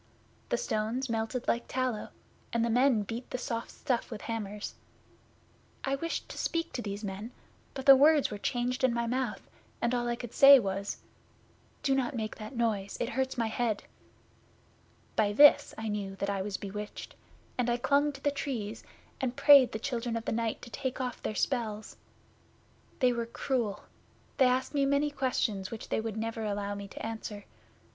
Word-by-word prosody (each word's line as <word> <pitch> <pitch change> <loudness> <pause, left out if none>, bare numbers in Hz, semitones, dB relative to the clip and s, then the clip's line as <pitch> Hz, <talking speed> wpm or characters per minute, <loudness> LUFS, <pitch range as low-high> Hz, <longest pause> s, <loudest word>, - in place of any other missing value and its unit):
The - - +1
stones 230 - -1
melted 225 +2 -2
like 235 - +1
tallow, 255 -4 -2 0.4
and 235 0 +1
the 235 - 0
men 245 -2 +4
beat 230 +5 -6
the - - -3
soft 230 -2 -3
stuff 245 -3 -2
with 220 -4 -6
hammers. 210 -2 -4 1.1
I 270 - 0
wished 330 +5 -2
to - - -7
speak 335 0 -1
to 245 - -3
these 205 -1 -5
men, 200 +3 -5 0.5
but 265 -1 -5
the 275 -1 +10
words 295 0 +5
were 205 - -5
changed 245 +4 -1
in 250 -2 +3
my 235 0 0
mouth, 250 0 -2 0.3
and 235 +1 0
all 240 -1 0
I 240 - 0
could 240 -1 -8
say 280 0 +10
was, 200 -3 -2 0.9
"Do 275 - +3
not 265 0 0
make 220 -2 -3
that 215 +3 -8
noise. 215 -4 -1
It 240 - -1
hurts 265 -1 -1
my 230 - +1
head." 220 -1 -1 1.3
By 205 -2 +2
this 285 +3 +7
I 225 - -4
knew 205 -2 -3
that 200 +1 -2
I 195 -1 -1
was 195 0 -3
bewitched, 210 +1 -7 0.4
and 245 -1 0
I 240 - +2
clung 280 +4 +2
to 275 - -11
the 285 - +3
Trees, 230 -6 -4 0.4
and 255 -1 -1
prayed 280 -4 +7
the - - -3
Children 235 -1 -2
of 225 - -6
the - - -1
Night 230 -1 -2
to 235 - -10
take 260 +3 -3
off 250 -2 -3
their 215 - -3
spells. 220 -5 -2 1.1
They 250 -1 +5
were 235 -1 -2
cruel. 235 -3 -2 0.5
They 265 - +6
asked 255 +3 0
me 285 -1 +2
many 280 +2 +2
questions 235 -8 -1
which 225 - -8
they - - 0
would 220 -1 -4
never 225 0 -3
allow 205 -1 -2
me 200 0 -6
to 195 - -7
answer. 220 -2 -6
235 Hz, 185 wpm, -30 LUFS, 215-260 Hz, 1.3 s, the